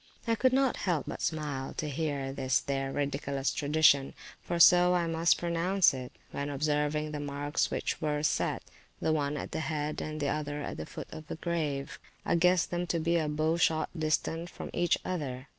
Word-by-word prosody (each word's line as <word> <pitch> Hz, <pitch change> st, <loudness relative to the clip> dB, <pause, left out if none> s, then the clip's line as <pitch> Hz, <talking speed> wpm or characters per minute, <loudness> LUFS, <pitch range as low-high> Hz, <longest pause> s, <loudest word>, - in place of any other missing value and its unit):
I 230 Hz, -, +2 dB
could 255 Hz, +3 st, +3 dB
not 265 Hz, 0 st, +2 dB, 0.3 s
but -, -, -6 dB
smile 145 Hz, -4 st, -3 dB
to 155 Hz, -, -3 dB
hear 140 Hz, -2 st, -2 dB
this 130 Hz, -1 st, +1 dB
their 135 Hz, -1 st, -2 dB
ridiculous 140 Hz, -1 st, -1 dB
tradition 145 Hz, -2 st, +3 dB, 0.3 s
(for 175 Hz, -1 st, -3 dB
so 180 Hz, +1 st, +7 dB
I 175 Hz, -1 st, +1 dB
must 165 Hz, +1 st, +3 dB
pronounce 175 Hz, +2 st, +2 dB
it), 130 Hz, -1 st, -6 dB, 0.2 s
when 140 Hz, 0 st, -3 dB
observing 150 Hz, +1 st, 0 dB
the 150 Hz, -, -4 dB
marks 145 Hz, +1 st, -1 dB
which -, -, -2 dB
were 150 Hz, -1 st, -1 dB
set, -, -, 0 dB, 0.4 s
the 160 Hz, -, +1 dB
one 145 Hz, -1 st, 0 dB
at -, -, -5 dB
the -, -, -2 dB
head, 150 Hz, 0 st, -2 dB
and 155 Hz, 0 st, -4 dB
the 145 Hz, -2 st, 0 dB
other 150 Hz, 0 st, -3 dB
at -, -, -5 dB
the 80 Hz, -, -6 dB
foot -, -, -8 dB
of 155 Hz, -1 st, -9 dB
the -, -, -4 dB
grave: 155 Hz, -5 st, -3 dB, 0.3 s
I -, -, +1 dB
guessed 180 Hz, +1 st, +3 dB
them 175 Hz, 0 st, -1 dB
to 170 Hz, -, 0 dB
be 170 Hz, +1 st, +2 dB
a 155 Hz, -2 st, 0 dB
bow 155 Hz, +2 st, +1 dB
shot 160 Hz, -2 st, +1 dB
distant 160 Hz, +1 st, -1 dB
from -, -, -8 dB
each 175 Hz, 0 st, +2 dB
other. 140 Hz, -7 st, -4 dB
155 Hz, 195 wpm, -30 LUFS, 145-170 Hz, 0.4 s, so